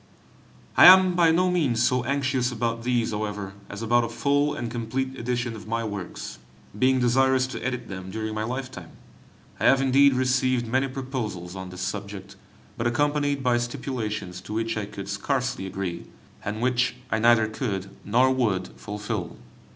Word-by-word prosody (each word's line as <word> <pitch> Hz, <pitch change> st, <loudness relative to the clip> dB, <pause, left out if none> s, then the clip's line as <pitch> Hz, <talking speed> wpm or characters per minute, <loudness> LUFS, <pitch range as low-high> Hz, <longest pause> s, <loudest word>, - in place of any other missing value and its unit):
I -, -, +10 dB
am 185 Hz, 0 st, +8 dB
by 170 Hz, -2 st, +4 dB
no 180 Hz, +3 st, +3 dB
means 135 Hz, -10 st, +1 dB
so 125 Hz, 0 st, +2 dB
anxious 130 Hz, -2 st, 0 dB
about 115 Hz, -1 st, -2 dB
these, 120 Hz, -1 st, 0 dB
however, 105 Hz, -2 st, -4 dB, 0.2 s
as 100 Hz, +3 st, -6 dB
about 120 Hz, +1 st, +3 dB
a 115 Hz, -, -3 dB
full 145 Hz, +5 st, +1 dB
and 120 Hz, -4 st, -4 dB
complete 125 Hz, +3 st, -3 dB
edition 120 Hz, -1 st, -2 dB
of 110 Hz, 0 st, -10 dB
my 115 Hz, +1 st, -1 dB
works, 100 Hz, -5 st, -6 dB, 0.4 s
being 130 Hz, +1 st, +4 dB
desirous 130 Hz, +1 st, +3 dB
to 130 Hz, -, -6 dB
edit 125 Hz, -2 st, -3 dB
them 95 Hz, -1 st, -7 dB
during 110 Hz, +2 st, -4 dB
my 110 Hz, -, -3 dB
lifetime. 125 Hz, -7 st, -5 dB, 0.7 s
I -, -, -1 dB
have 135 Hz, -, +6 dB
indeed 135 Hz, +1 st, +4 dB
received 130 Hz, -1 st, +1 dB
many 130 Hz, +4 st, +1 dB
proposals 125 Hz, -9 st, -5 dB
on 95 Hz, -1 st, -6 dB
this 90 Hz, 0 st, -8 dB
subject, 100 Hz, 0 st, -5 dB, 0.4 s
but 115 Hz, -, +1 dB
accompanied 145 Hz, +2 st, 0 dB
by 120 Hz, -1 st, +3 dB
stipulations 110 Hz, -7 st, -4 dB
to 105 Hz, -, -8 dB
which 115 Hz, +1 st, -1 dB
I 105 Hz, -2 st, -3 dB
could 100 Hz, -1 st, -8 dB
scarcely 125 Hz, +1 st, -2 dB
agree, 95 Hz, -3 st, -5 dB, 0.4 s
and 105 Hz, +2 st, -4 dB
which 125 Hz, 0 st, +1 dB, 0.2 s
I 110 Hz, -, +1 dB
neither 115 Hz, -1 st, +5 dB
could 100 Hz, -4 st, -4 dB
nor 125 Hz, +5 st, +3 dB
would 105 Hz, -8 st, 0 dB
fulfil. 105 Hz, -2 st, -5 dB
120 Hz, 165 wpm, -25 LUFS, 105-130 Hz, 0.7 s, I